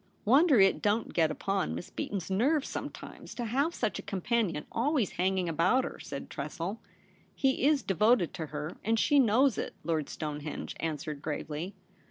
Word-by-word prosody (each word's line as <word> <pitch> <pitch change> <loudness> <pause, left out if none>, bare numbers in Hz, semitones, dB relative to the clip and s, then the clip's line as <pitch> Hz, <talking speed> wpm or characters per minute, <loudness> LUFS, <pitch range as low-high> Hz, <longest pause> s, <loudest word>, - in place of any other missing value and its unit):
* - - -37
Wonder 275 +3 +6
it 195 0 +5
don't 210 +2 +1
get 160 -2 +3
upon 195 +5 -1
Miss - - -7
Beaton's 195 -2 -4
nerves 270 +9 +2
sometimes - - -7
to 240 - -3
have 280 +9 0
such 220 -4 -1
a - - -4
companion 195 -5 -1
always 250 - +1
hanging 185 0 0
about 170 - +3
her,' - - -6
said 140 -1 -6
Tressel. 165 +9 -4 0.3
* - - -33
He 265 -1 +1
is 295 -2 +3
devoted 210 -1 +3
to 160 -3 -4
her, 150 +2 -5
and 225 +2 +2
she 285 +5 +4
knows 250 +1 +4
it,' - - -4
Lord 155 -2 -1
Stonehenge 150 -1 -5
answered 155 -2 -3
gravely. 155 +4 -4
195 Hz, 175 wpm, -30 LUFS, 160-245 Hz, 0.3 s, Wonder